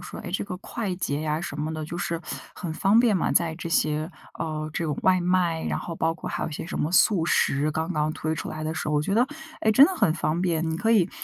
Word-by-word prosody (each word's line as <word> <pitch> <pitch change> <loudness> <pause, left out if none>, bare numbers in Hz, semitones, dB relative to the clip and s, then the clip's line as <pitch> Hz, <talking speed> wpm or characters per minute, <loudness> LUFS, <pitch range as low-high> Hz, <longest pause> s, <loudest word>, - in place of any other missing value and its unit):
说， 175 - -8
哎， - - -7
这 190 - -1
个 190 -3 -5
快 200 -1 -4
捷 145 -5 -2
呀 155 0 -1
什 155 -4 -5
么 155 +1 -2
的 155 -1 -4
就 170 +3 -6
是 170 -1 -2 0.3
很 170 -3 -5
方 195 +7 +3
便 230 -4 +3
嘛， 175 - 0
在 165 -2 +2
这 170 - -5
些， 155 -1 +1 0.3
呃， 155 -1 -3
这 170 - -2
种 150 -3 -1
外 185 -1 +4
卖， 175 -2 +1
然 - - -1
后 170 -2 -6
包 165 0 +1
括 - - -6
还 - - -2
有 - - -2
一 - - -8
些 - - -5
什 170 - -5
么 150 - 0
速 185 -3 +4
食， 145 -2 +2
刚 160 +4 -2
刚 155 -1 0
推 155 0 -2
出 - - -5
来 155 - -5
的 155 +1 -2
时 155 - -3
候。 150 - 0
我 150 - +2
觉 195 - -1
得， 240 +3 +4 0.3
哎， 220 - +3
真 265 +6 +9
的 375 - -2
很 210 - +3
方 160 0 -1
便。 165 -3 0
你 160 - -1
可 220 +6 0
以 195 -6 +4
165 Hz, 300 characters per minute, -25 LUFS, 155-185 Hz, 0.3 s, 真